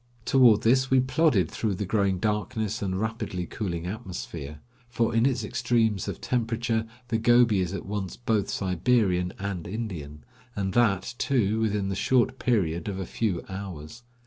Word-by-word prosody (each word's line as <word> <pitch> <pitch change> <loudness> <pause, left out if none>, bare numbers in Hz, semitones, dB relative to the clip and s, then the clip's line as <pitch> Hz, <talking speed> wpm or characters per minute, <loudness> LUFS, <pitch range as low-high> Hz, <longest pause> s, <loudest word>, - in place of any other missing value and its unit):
Toward 120 -6 +5
this 130 +3 +3
we 130 - +5
plodded 130 - +2
through 105 -4 -1
the 105 - -3
growing 100 -1 +1
darkness 110 +2 -2
and 95 -1 -1
rapidly 110 -5 -3
cooling 85 -4 -4
atmosphere; 85 -6 -6 0.3
for 120 -2 0
in 115 +3 +4
its 125 -4 0
extremes 115 -4 0
of - - -4
temperature 115 -1 -1 0.2
the 115 -1 +1
Gobi 120 -3 +4
is 90 -2 -1
at 95 - -5
once 100 -2 -4
both 110 -4 0
Siberian 90 -1 +1
and 95 -4 -4
Indian, 85 -9 -6 0.3
and 95 -2 -2
that, 100 -5 +2
too, 110 -5 +1
within 105 -3 0
the 95 - -2
short 130 +4 +2
period 85 -8 0
of 100 -2 -3
a 95 - -3
few 95 -3 -2
hours. 95 +1 -7
105 Hz, 160 wpm, -27 LUFS, 95-115 Hz, 0.3 s, Toward